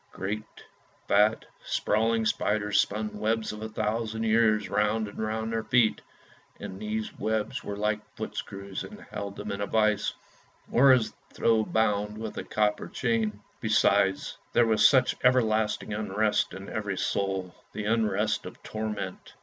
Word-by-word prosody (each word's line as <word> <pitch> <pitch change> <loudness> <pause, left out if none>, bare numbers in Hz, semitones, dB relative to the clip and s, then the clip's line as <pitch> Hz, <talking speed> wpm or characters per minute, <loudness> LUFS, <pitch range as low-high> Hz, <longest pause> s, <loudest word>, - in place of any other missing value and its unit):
Great, 100 +3 -3 0.7
fat, 105 +2 +3 0.2
sprawling 110 +1 +1
spiders 105 -1 +1
spun 105 0 -1
webs 110 +1 0
of 105 0 -8
a 110 - -4
thousand 110 +1 -2
years 110 -2 +3
round 105 +1 +1
and 100 - -10
round 110 +1 -2
their 115 - 0
feet; 120 -2 +3 0.6
and 95 - -7
these 110 0 -3
webs 110 -1 -1
were 100 - -5
like 105 0 0 0.2
footscrews 100 0 -5
and 210 0 -10
held 100 -1 -5
them - - -5
as - - -1
in 100 - -4
a 100 - -1
vice, 110 -2 +2 0.6
or 135 +2 +6
as 125 -4 +3 0.2
though 110 -1 +3
bound 105 -1 0
with 110 -1 -5
a - - -4
copper 105 -1 0
chain. 110 -4 -1 0.2
Besides, 100 -3 +2
there 120 - +5
was 110 -1 +6
such 130 -3 +3
everlasting 110 -4 +2
unrest 105 0 0
in 95 +1 -8
every 105 -4 -3
soul; 95 -2 -1 0.2
the 105 - -5
unrest 110 -1 +1
of - - -12
torment. 105 -3 -5
110 Hz, 150 wpm, -28 LUFS, 105-110 Hz, 0.7 s, or